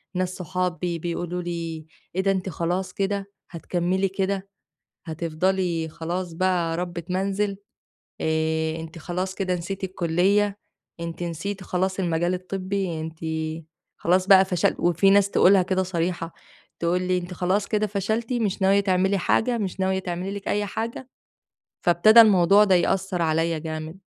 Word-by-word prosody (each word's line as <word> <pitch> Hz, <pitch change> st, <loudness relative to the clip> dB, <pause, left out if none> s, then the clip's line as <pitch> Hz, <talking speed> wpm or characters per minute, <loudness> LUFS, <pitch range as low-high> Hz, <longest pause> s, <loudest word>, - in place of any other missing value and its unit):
وناس 185 Hz, 0 st, -1 dB
صحابي 180 Hz, -1 st, -2 dB
بيقولوا 175 Hz, +1 st, -3 dB
لي: 165 Hz, -2 st, -5 dB, 0.3 s
"إيه 190 Hz, -, +2 dB
ده 195 Hz, 0 st, +2 dB
أنتِ 190 Hz, 0 st, -2 dB
خلاص 180 Hz, +3 st, -2 dB
كده، 200 Hz, 0 st, -2 dB, 0.2 s
هتكمِّلي 180 Hz, +3 st, -1 dB
كده، 195 Hz, 0 st, -2 dB, 0.6 s
هتفضلي 165 Hz, +1 st, -1 dB
خلاص 175 Hz, +2 st, -4 dB
بقى 170 Hz, -2 st, 0 dB
ربِّة 175 Hz, -1 st, -4 dB
منزل؟ 195 Hz, +2 st, -1 dB, 0.7 s
آآ 160 Hz, 0 st, 0 dB
أنتِ 160 Hz, +1 st, -9 dB
خلاص 185 Hz, +3 st, -3 dB
كده 185 Hz, -2 st, -1 dB
نسيتِ 190 Hz, +3 st, -4 dB
الكُلّية، 190 Hz, +3 st, +1 dB, 0.4 s
أنتِ 170 Hz, 0 st, -5 dB
نسيتِ 175 Hz, +4 st, -4 dB
خلاص 185 Hz, +2 st, -1 dB
المجال 175 Hz, 0 st, 0 dB
الطبّي، 185 Hz, -2 st, -3 dB
أنتِ 160 Hz, 0 st, -7 dB, 0.8 s
خلاص 185 Hz, +2 st, +2 dB
بقى 190 Hz, -1 st, +8 dB
فشل" 180 Hz, -3 st, +1 dB
وفي 175 Hz, +3 st, +3 dB
ناس 200 Hz, 0 st, +4 dB
تقولها 190 Hz, 0 st, +5 dB
كده 190 Hz, +1 st, 0 dB
صريحة، 170 Hz, -2 st, -2 dB, 0.5 s
تقول 175 Hz, +2 st, +1 dB
لي: 185 Hz, 0 st, +1 dB
"أنتِ 180 Hz, 0 st, -6 dB
خلاص 190 Hz, +3 st, 0 dB
كده 215 Hz, -1 st, +1 dB
فشلتِ 220 Hz, +4 st, -2 dB
مش 215 Hz, -5 st, -1 dB
ناوية 195 Hz, +1 st, +5 dB
تعملي 190 Hz, 0 st, +2 dB
حاجة، 235 Hz, +6 st, +1 dB
مش 195 Hz, -3 st, -3 dB
ناوية 190 Hz, 0 st, +1 dB
تعملي 180 Hz, +1 st, -4 dB
لِك 200 Hz, -, -6 dB
أي 205 Hz, 0 st, 0 dB
حاجة؟" 230 Hz, +5 st, -5 dB, 0.7 s
فابتدا 215 Hz, +7 st, +7 dB
الموضوع 200 Hz, -1 st, +5 dB
ده 195 Hz, -3 st, +4 dB
يأثّر 185 Hz, 0 st, +1 dB
عليّا 165 Hz, 0 st, +1 dB
جامد. 155 Hz, +2 st, -6 dB
185 Hz, 145 wpm, -24 LUFS, 170-195 Hz, 0.8 s, بقى